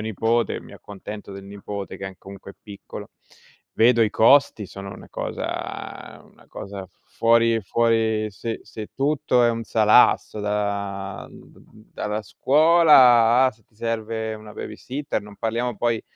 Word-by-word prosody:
nipote, 115 +1 -1
mi - - -14
accontento 105 +1 -10
del 95 0 -9
nipote 100 0 -7
che 95 - -6
è - - -6
n 95 - -17
comunque 100 0 -12
è - - -29
piccolo. 100 -2 -10 0.6
Vedo 120 +1 +4
i 110 - +4
costi, 115 0 +4
sono 100 0 -9
una - - -13
cosa - - -6
una - - -22
cosa 100 -1 -8
fuori 115 0 +2
fuori 110 0 +1
se 115 +3 -6
se 110 -1 -9
tutto 140 -2 +1
è 120 - +4
un 115 0 -4
salasso 110 -1 +3
da 100 -1 -3
d - - -17 0.3
da - - -5
dalla 105 +1 -3
scuola 130 - +5
a - - +1
se 110 -3 -25
ti - - -36
serve 110 0 -3
una 105 -1 -12
babysitter, 130 +7 -5
non 105 0 -13
parliamo 115 +1 -2
poi 115 -1 -1
110 Hz, 150 wpm, -23 LUFS, 100-115 Hz, 0.6 s, scuola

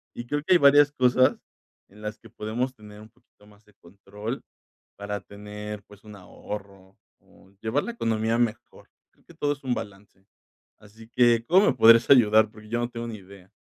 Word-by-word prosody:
Y 120 - -7
creo 145 +2 -2
que 185 - +3
hay - - +7
varias 145 +1 +6
cosas 130 -1 +2 0.5
en 105 +2 -18
las 105 0 -6
que - - -17
podemos 120 +5 -4
tener 105 -1 -14
un 110 +1 -14
poquito 120 -3 -28
más 105 +1 -22
de 105 - -25
control, 105 +7 -8 0.5
para 100 -1 -5
tener, 105 0 -9
pues, 105 0 -19
un 105 -1 -12
ahorro, 100 0 -10 0.2
o 95 - -23
llevar 115 +6 -1
la 235 - -5
economía 115 - -1
mejor, 120 0 -4 0.2
creo - - -33
que 170 - -17
todo 145 -2 -1
es 140 - -16
un 125 -2 -1
balance. 100 -1 -10 0.5
Así 110 +2 -17
que, 120 -1 +3
¿cómo 190 +4 +4
me - - +3
podrías 115 +1 +6
ayudar? 110 -4 +5
Porque 105 -1 -15
yo 120 +1 -1
no 120 0 -2
tengo 120 0 -7
ni 110 -2 -7
idea. 95 0 -17
110 Hz, 195 wpm, -25 LUFS, 105-120 Hz, 0.5 s, hay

